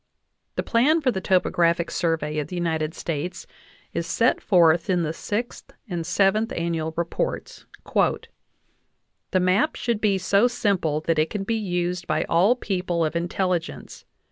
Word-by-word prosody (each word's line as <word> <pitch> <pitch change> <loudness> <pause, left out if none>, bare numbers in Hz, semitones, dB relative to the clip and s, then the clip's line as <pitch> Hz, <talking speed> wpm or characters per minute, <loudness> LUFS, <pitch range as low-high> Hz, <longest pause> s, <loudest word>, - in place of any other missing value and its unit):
The - - -1
plan 280 +8 +3
for 270 -5 +1
the 190 -4 -3
topographic 170 -2 +2
survey 160 -3 -1
of 145 - -3
the 180 - -7
United 160 -2 -1
States 170 +3 -4 0.5
is - - -2
set - - +2
forth 170 -3 +4
in 180 -2 +2
the 155 0 -2
Sixth 215 +7 -4 0.2
and 170 -4 -4
Seventh 200 +5 +2
Annual 165 -1 -2
Reports. 170 - -3 1.6
"The 185 - +2
map 185 +11 +2
should 235 -3 -2
be 200 -3 +2
so 200 +5 +3
simple 200 -11 0
that 160 0 0
it 155 - +2
can 205 -2 -3
be 230 - -1
used 180 -4 -2
by 155 0 +1
all 190 +9 +3
people 180 -7 -1
of 155 - -3
intelligence. 175 0 -2
180 Hz, 150 wpm, -24 LUFS, 165-200 Hz, 1.6 s, forth